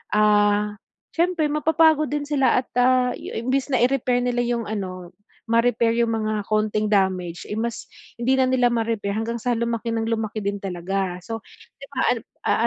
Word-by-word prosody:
ah, 210 -1 +3 0.3
siyempre 340 -1 +1
mapapagod 310 0 +3
din 295 0 -2
sila 280 -3 +2
at, - - -39
ah, 250 0 +4
yu - - -8
imbes 260 +4 0
na 255 -3 +2
i-repair 250 -1 +1
nila 245 -1 0
yung 235 -1 -1
ano, 185 -5 -5 0.4
ma-repair 230 0 +2
yung 230 - 0
mga 215 -2 -1
konting 215 0 0
damage, 185 -4 0
eh 210 - -4
mas 235 +1 -3 0.3
hindi 260 +3 +2
na 260 - +5
nila 255 -1 +3
ma-repair 225 -3 -1
hanggang 230 +2 -2
sa 240 +1 0
lumaki 230 0 -2
ng 225 - -1
lumaki 220 -1 -2
din 200 0 -2
talaga. 185 0 -3
So, 225 +2 -5 0.4
di - - -10
ba, - - -4 0.2
an - - -5 0.3
a - - +4
230 Hz, 175 wpm, -23 LUFS, 210-250 Hz, 0.4 s, na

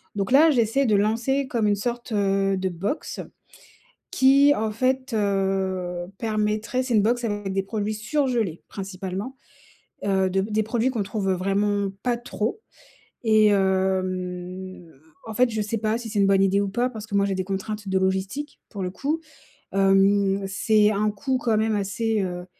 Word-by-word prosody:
Donc, 200 +4 -2
là, 310 +4 +7
j'essaie 245 +1 +2
de 215 -4 +3
lancer 230 +7 +1
comme 230 -4 0
une 205 - +3
sorte, 240 +3 -4
heu, 195 -2 +1
de 190 0 -1
box 195 - -4 0.9
qui, 280 -3 +5
en 220 -3 -1
fait, 260 +3 -1
heu, 190 -3 -1
permettrait 215 +3 -1
c'est 245 - -2
une 210 - +5
box 240 +3 +1
avec 205 -3 -2
des 195 0 0
produits 210 +1 -2
surgelés 230 - -1
principalement, 195 +5 -6 0.7
heu, 190 -1 +2
de 190 +1 +1
p 205 - -5
des 215 +1 +2
produits 235 +3 0
qu'on 230 -5 -1
trouve 195 -1 -1
vraiment 200 +2 0
pas 245 -1 +1
trop 240 - -3 0.6
et 215 -1 +5
hem, 185 -2 -1 0.4
en 220 - -5
fait, 250 +3 +4
je 220 -1 -1
sais 220 +2 -2
pas 215 +1 0
si 240 -1 -7
c'est 210 - -2
une 200 - +4
bonne 195 0 +4
idée 195 +1 +3
ou 200 - 0
pas 245 +5 0
parce 220 -2 -8
que 205 - -8
moi 200 0 +3
j'ai 195 - -1
des 185 - -2
contraintes 200 +2 -4
de 190 - 0
logistique, 190 +10 -2
pour 200 -3 -5
le 180 - -2
coup. 295 - -2 0.5
Hem, 195 0 +3
c'est 210 +2 +3
un 210 +1 +1
coût 255 +6 -1
quand 230 -3 +1
même 220 0 +1
assez, 210 +2 -1
heu, 180 -1 -4
205 Hz, 180 wpm, -24 LUFS, 195-230 Hz, 0.9 s, là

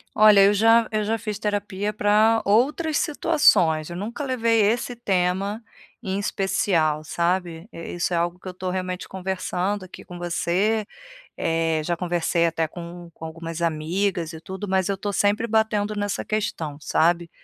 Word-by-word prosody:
Olha, 215 -2 +7
eu 200 +1 +5
já 225 +2 +5
eu 215 -1 0
já 220 +2 0
fiz 210 -1 -4
terapia 205 -1 -2
pra 215 +2 +3
outras 290 +9 +2
situações, 210 - +3
eu 175 - -6
nunca 230 +10 -5
levei 230 -4 +1
esse 235 +4 +1
tema 195 0 -1 0.4
em 195 -4 -3
especial, 185 -6 0
sabe? 170 +2 -2
Eh, 165 - -8
isso 175 +1 -1
é - - +2
algo 175 +1 -1
que 185 - -12
eu - - -4
estou 185 0 -4
realmente 185 0 -4
conversando 190 +1 -3
aqui 185 - -12
com 180 - -10
você, 185 +5 0 0.5
eh, 165 -1 0
já 175 +2 -1
conversei 170 -1 0
até 165 -1 -1
com 170 +1 -9
com 160 - -10
algumas 165 +1 -6
amigas 170 +2 -1
e 160 - -9
tudo, 190 +3 -7
mas 190 0 +1
eu 200 - 0
tô 205 +1 -3
sempre 205 +3 +1
batendo 215 -2 +1
nessa 205 -1 -2
questão, 165 -8 -3
sabe? 170 +2 +1
190 Hz, 165 wpm, -24 LUFS, 170-210 Hz, 0.5 s, Olha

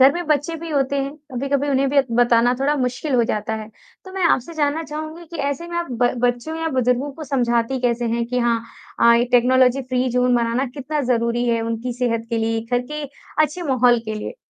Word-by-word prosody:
घर 265 +1 +7
में 345 +1 -4
बच्चे 300 +2 0
भी 330 +1 -7
होते 280 -1 0
हैं, 275 +1 -4 0.2
कभी-कभी 275 +3 -1
उन्हें 270 0 +2
भी 290 - -1
अ, 275 - +7
बताना 240 +1 +3
थोड़ा 285 +2 +2
मुश्किल 255 +2 -2
हो 240 -2 +4
जाता 220 0 -2
है, 215 -1 -6 0.4
तो 375 - -11
मैं 380 -1 -1
आपसे 335 0 +1
जानना 300 +1 0
चाहूँगी 310 +2 -7
कि 335 +1 -8
ऐसे 285 +4 -3
में 345 - -5
आप 345 0 -1 0.2
ब 245 - +3
बच्चों 245 +6 -2
या 325 0 -2
बुज़ुर्गों 250 +3 +1
को 310 +3 -8
समझाती 245 -2 0
कैसे 240 -1 0
हैं 235 0 0
कि 250 +1 -1
हाँ 235 -1 +1 0.4
अ, 235 - +7
ये 235 +1 +3
टेक्नोलॉजी 255 +2 +4
फ्री 255 0 -1
ज़ोन 250 0 +2
बनाना 235 +3 0
कितना 295 +2 -3
ज़रूरी 235 0 0
है 230 -1 +1
उनकी 230 +2 -3
सेहत 235 -2 -1
के 230 - 0
लिए? 225 0 0
घर 245 0 +2
के 300 0 -4 0.4
अच्छे 310 +4 -5
माहौल 250 -5 +3
के 220 -1 -4
लिए? 215 - -6
255 Hz, 225 wpm, -21 LUFS, 235-290 Hz, 0.4 s, घर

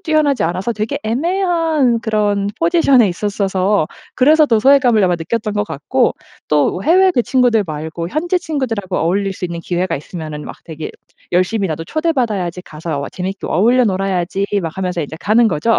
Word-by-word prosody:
뛰어나지 305 -4 +1
않아서 180 +7 -1
되게 215 0 -3
애매한 320 - +1
그런 205 -3 0
포지션에 330 - +4
있었어서 195 -1 0 0.3
그래서 305 +4 +5
더 230 -6 +2
소외감을 245 -4 +4
아마 180 -1 +2
느꼈던 210 +6 -3
것 205 - +1
같고 210 - 0 0.3
또 150 +5 +1
해외 370 +4 +4
그 245 - +2
친구들 245 -4 +2
말고 160 +2 -5
현지 350 - -1
친구들하고 230 - -3
어울릴 195 +4 0
수 185 - -6
있는 170 -1 -4
기회가 175 0 -1
있으면은 155 0 -7
막 - - -8
되게 160 -1 -7 0.4
열심히 185 +2 +1
'나도 165 +1 -4
초대받아야지. 230 - -1
가서 155 -1 -5
어 - - -5
재밌게 190 +2 -5
어울려 240 +8 +3
놀아야지.' 195 -1 -1 0.2
막 165 - -4
하면서 180 -2 -2
인제 150 0 -5
가는 225 +3 +3
거죠. 220 +6 +1
205 Hz, 395 characters per minute, -17 LUFS, 175-255 Hz, 0.4 s, 그래서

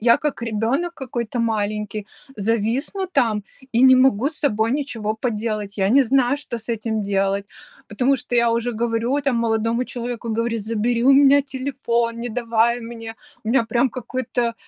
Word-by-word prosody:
я 235 +1 +5
как 295 -5 -3
ребёнок 235 +10 -1
какой-то 245 -4 -4
маленький, 210 -2 -2 0.3
зависну 230 - -1
там, 215 -4 +2 0.3
и 235 +2 +3
не 260 0 +8
могу 255 -2 +3
с 315 - -10
собой 225 -4 +1
ничего 235 -7 -2
поделать. 215 -3 -3
Я 190 0 +2
не 275 +4 +6
знаю, 260 +2 +2
что 265 -5 -5
с 230 +1 -4
этим 220 -1 -2
делать, 195 0 0 0.4
потому 255 +6 +1
что 245 -1 -3
я 235 0 +4
уже 235 +1 0
говорю 235 +4 0
там 275 -4 0
молодому 230 +1 0
человеку, 240 -1 -5
говорю: 230 +1 -1
"Забери 230 +2 -1
у 275 - +7
меня 280 +1 +6
телефон, 260 -4 -2
не 240 - -3
давай 235 0 +1
мне". 230 -1 -8 0.3
У - - -4
меня 235 0 +3
прям 235 +3 +1
какой-то, 255 +1 -3
э, 235 -1 -1
235 Hz, 170 wpm, -21 LUFS, 220-255 Hz, 0.4 s, не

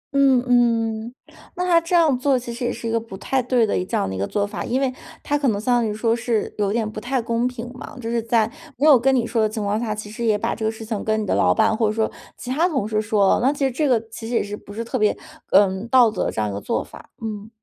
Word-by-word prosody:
嗯 270 -3 +4
嗯。 230 -2 +1 0.4
那 360 - -1
他 340 -2 +4
这 335 +2 -1
样 320 -6 +4
做 270 0 +2
其 240 -1 -6
实 245 +2 -6
也 240 - 0
是 235 0 -6
一 - - -1
个 230 - +1
不 225 -4 -10
太 265 +6 0
对 245 -1 +2
的 210 - -1
一 - - 0
这 185 - -2
样 95 - -1
一 - - -4
个 100 +1 -1
做 205 -1 0
法。 205 0 -5
因 250 +3 -1
为 265 -2 0 0.3
他 290 - 0
可 285 -2 0
能 210 -4 +1
相 245 +4 +1
当 225 - 0
于 - - -2
说 225 +2 +1
是 230 -2 -1
有 200 -1 +1
点 220 0 -1
不 215 0 -7
太 255 +3 -1
公 230 +1 0
平 245 -1 -6
嘛， 255 - -10
就 230 -2 -5
是 235 -1 0
在 225 -1 +2 0.3
没 280 - +1
有 290 -4 +8
跟 270 +3 +3
你 240 -3 +1
说 230 -1 0
的 215 - +2
情 215 0 -4
况 205 +1 0
下， 225 -2 -2
其 210 -1 -7
实 225 +2 -6
也 220 -2 +3
把 - - -1
这 225 - -6
个 220 - +1
事 225 0 -9
情 215 -2 -3
跟 220 0 0
你 - - -3
的 - - 0
老 - - +4
板， 220 0 +2
或 220 0 +1
者 210 - 0
说 220 0 0 0.3
其 245 - -8
他 325 +7 +2
同 265 - -1
事 215 -1 0
说， 210 -2 +2
那 260 +3 +3
其 285 -1 -1
实 265 - +1
这 295 +4 0
个 245 -4 +3
其 225 0 -7
实 240 - -2
也 205 -2 -1
不 205 - -14
是 225 +2 -4
特 230 - -3
别， 210 -1 +2 0.4
呃， 190 0 +4
道 245 -2 +6
德 200 - -1
这 - - -4
样 105 - -1
一 - - -5
个 100 - -5
做 - - -1
法。 - - -14
嗯。 215 -1 -5
230 Hz, 325 characters per minute, -22 LUFS, 215-250 Hz, 0.4 s, 有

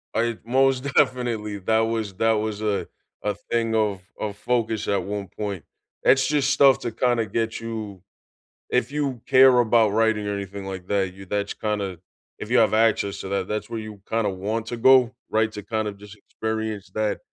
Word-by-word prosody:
I 115 -1 0
Most 130 +2 +2
definitely, 115 -5 +1
that 110 +4 +2
was 110 -2 -1
that 115 +3 +2
was, 110 -1 -2
uh, 105 -2 0 0.4
a 105 -1 -1 0.2
thing 115 -1 +1
of 105 -4 +1 0.2
of 105 -1 -4
focus 115 -3 -1
at 100 - +1
one 100 0 -4
point. 100 -2 -5 0.4
It's 130 0 +5
just 140 0 +1
stuff 140 -1 +5
to 120 - -4
kinda 120 0 +1
get 110 +2 -2
you 110 -4 -6 0.7
If 125 +1 0
you 140 -5 -2
care 130 -2 +7
about 115 -2 +4
writing 110 -2 +2
or 100 - -1
anything 100 0 -6
like 95 -1 -6
that, 95 -2 0
you 95 +1 -12
that's 100 +1 -2
kinda 100 -5 -3 0.4
if - - -7
you - - +5
have - - +3
access 105 -3 +2
to - - -6
that, 95 -1 -1
that's 105 +1 -3
where 115 -1 -4
you 110 -2 -9
kinda 115 -2 +1
want 105 +4 -3
to 120 - -4
go, 130 0 +5 0.2
right, 110 0 +1
to 105 - -7
kinda 110 -1 -2
just 100 0 -13
experience 110 -1 -4
that 110 -1 0
110 Hz, 185 wpm, -24 LUFS, 100-115 Hz, 0.7 s, care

